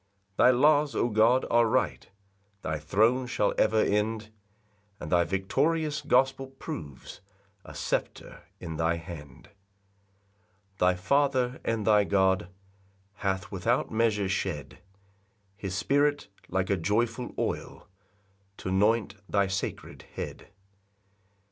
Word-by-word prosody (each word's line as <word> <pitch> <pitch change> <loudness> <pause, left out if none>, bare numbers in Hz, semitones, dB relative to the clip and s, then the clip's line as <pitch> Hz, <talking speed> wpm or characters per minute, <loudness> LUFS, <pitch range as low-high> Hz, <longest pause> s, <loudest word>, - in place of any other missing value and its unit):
4 - - +5
Thy - - +8
laws, 145 +3 +4
O 120 - +1
God, 115 +4 +3
are 120 0 +4
right; - - -1 0.5
Thy 80 -1 -2
throne 110 - +2
shall 105 - 0
ever 110 0 +3
end; 110 +1 -1 0.7
And 75 - -7
thy 85 -1 +4
victorious 150 - 0
gospel 135 -1 +2
proves 80 - -9 0.4
A - - -12
sceptre - - -3 0.2
in 80 -1 -6
thy 80 +1 +1
hand. 80 -4 -10 1.3
5 - - -34
[Thy 90 0 +3
Father 130 +4 +1
and 115 -2 -1
thy 105 -1 +5
God 95 -2 +2 0.7
Hath 95 +1 -2
without 115 +6 0
measure 110 -3 +1
shed 95 - -3 0.8
His 95 -2 -5
Spirit, 145 +4 +1 0.2
like 95 +1 -1
a 100 - +2
joyful 115 +7 -1
oil, - - -4 0.7
T'anoint 100 +3 +1 0.2
thy 100 -1 +2
sacred 95 +1 -4
head. - - -6
105 Hz, 115 wpm, -28 LUFS, 95-125 Hz, 1.3 s, Thy